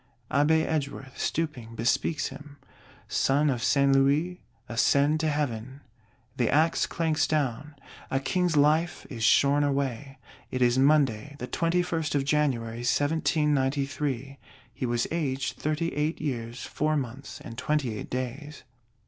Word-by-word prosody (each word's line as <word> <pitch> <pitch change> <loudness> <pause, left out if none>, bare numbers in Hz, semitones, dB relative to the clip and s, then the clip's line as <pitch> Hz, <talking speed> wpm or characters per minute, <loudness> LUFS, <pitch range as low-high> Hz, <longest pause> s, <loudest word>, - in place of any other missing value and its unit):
Abbé 160 +3 +3
Edgeworth, 140 -3 -4
stooping, 125 -8 -3
bespeaks 125 +7 0
him: 145 0 -12 0.5
"Son 145 +2 +2
of 120 -2 -2
Saint 140 -1 +3
Louis, 145 +7 +2 0.3
ascend 140 +6 +2
to 155 0 +1
Heaven." 135 -2 -3 0.6
The 120 -3 +2
Axe 160 +3 +2
clanks 160 -3 0
down; 145 0 -1 0.3
a 135 - +1
King's 165 +5 0
Life 155 +4 +2
is 115 -4 -5
shorn 140 +5 +4
away. 135 -1 -2 0.3
It 130 -1 0
is 120 +1 +3
Monday, 140 -2 +2
the 125 - -5
21st 165 -2 0
of 135 -1 +1
January, 130 -6 0
1793. 140 -1 0 0.3
He - - -3
was 120 0 0
aged 135 -5 -2
Thirty 155 +2 -1
eight 150 +2 -1
years 120 -5 -4
four 155 +1 0
months 135 0 -6
and 115 - -9
twenty 130 -2 -1
eight - - -7
days. 130 +4 -5
140 Hz, 130 wpm, -27 LUFS, 130-155 Hz, 0.6 s, shorn